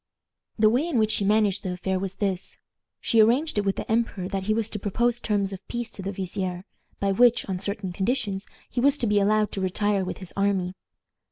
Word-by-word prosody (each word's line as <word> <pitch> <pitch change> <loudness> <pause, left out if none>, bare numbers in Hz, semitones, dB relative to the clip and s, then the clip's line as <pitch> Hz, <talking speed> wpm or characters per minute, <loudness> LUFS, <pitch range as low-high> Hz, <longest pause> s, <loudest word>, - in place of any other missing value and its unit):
The 215 -1 +5
way 265 +8 +1
in 320 -8 0
which 215 -1 +3
she 210 - +2
managed 205 -2 +3
the 185 - -3
affair 185 +1 -1
was 195 0 -2
this. 195 -3 -2 0.4
She 230 - +3
arranged 245 +4 +3
it 205 - -1
with 195 - +1
the - - -5
emperor 220 -5 0
that 195 -1 -3
he 215 - +2
was 225 -2 0
to 210 - -4
propose 235 +4 0
terms 200 -2 0
of 190 0 -10
peace 240 -1 -4
to 200 - -8
the 195 +1 -3
vizier, 185 -1 -4 0.3
by 200 0 +1
which, 240 +4 +4
on 185 -2 -2
certain 200 -1 -3
conditions, 200 -1 -1 0.2
he 240 - -2
was 280 +2 +4
to 245 - -1
be 205 -1 +3
allowed 210 +1 +2
to 195 - -3
retire 200 +1 +1
with 185 - -4
his 185 -3 -10
army. 195 -2 +1
200 Hz, 225 wpm, -26 LUFS, 190-225 Hz, 0.4 s, The